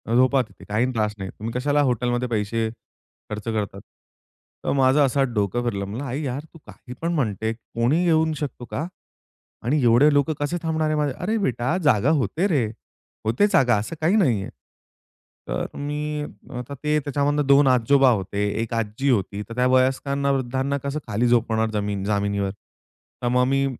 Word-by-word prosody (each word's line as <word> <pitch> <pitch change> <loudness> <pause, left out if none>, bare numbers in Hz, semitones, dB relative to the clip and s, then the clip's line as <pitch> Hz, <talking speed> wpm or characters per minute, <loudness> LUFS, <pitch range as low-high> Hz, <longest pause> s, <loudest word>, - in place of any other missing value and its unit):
झोपा 130 +2 +4
तिथे - - -11
काहीही 115 +5 0
त्रास 105 -2 0
नाही. 95 -1 -5
तुम्ही 110 +3 -6
कशाला 145 +3 +2
हॉटेलमध्ये 125 -1 0
पैसे 110 0 -1 0.6
खर्च 105 0 -5
करतात. 105 -3 -2 0.8
तर - - +1
माझं 135 +2 +4
असा 135 +1 +2
डोकं 105 +3 0
फिरलं, 100 -5 -2
म्हणला 110 +8 -5
आई, 135 +4 -3
यार! 135 +1 -3
तू - - -12
काही 125 - -11
पण 170 +1 0
म्हणते. 110 - -1
कोणी 120 +7 0
येऊ 160 -1 +3
शकतो 140 -4 -5
का? 150 - -2 0.8
आणि 140 +6 +1
एवढे 120 +6 +6
लोकं 145 +2 +2
कसे 145 +4 -1
थांबणारे? 160 -1 0
माझे 150 -3 0
अरे 215 +5 -1
बेटा, 135 - 0
जागा 130 -3 +3
होते 170 +9 0
रे! 145 - +2 0.6
होते 115 - +3
जागा, 120 -4 +4
असं 110 +10 -4
काही 170 +6 +3
नाहीये. 120 - +2 1.0
तर - - -2
मी 150 +1 -3 0.4
आता 125 +3 -7
ते 150 0 +2
त्याच्यामधनं 145 0 0
2 140 0 +6
आजोबा 130 +2 +5
होते, 100 -1 -1 0.2
एक 115 0 -4
आजी 115 +4 -1
होती. 105 -4 0
तर 115 - -7
त्या 125 +1 +2
वयस्कर 130 +2 +2
ना, 140 0 +1
वृद्धांना 135 +1 -1
कसं 140 +2 -2
खाली 115 +2 +1
झोपवणार, 115 -2 +2
जमीन 100 -2 -2
जामिनीवर. 100 -1 0 0.7
तर - - +1
मग 125 0 +3
मी 135 +1 +2
125 Hz, 170 wpm, -23 LUFS, 110-145 Hz, 1.0 s, एवढे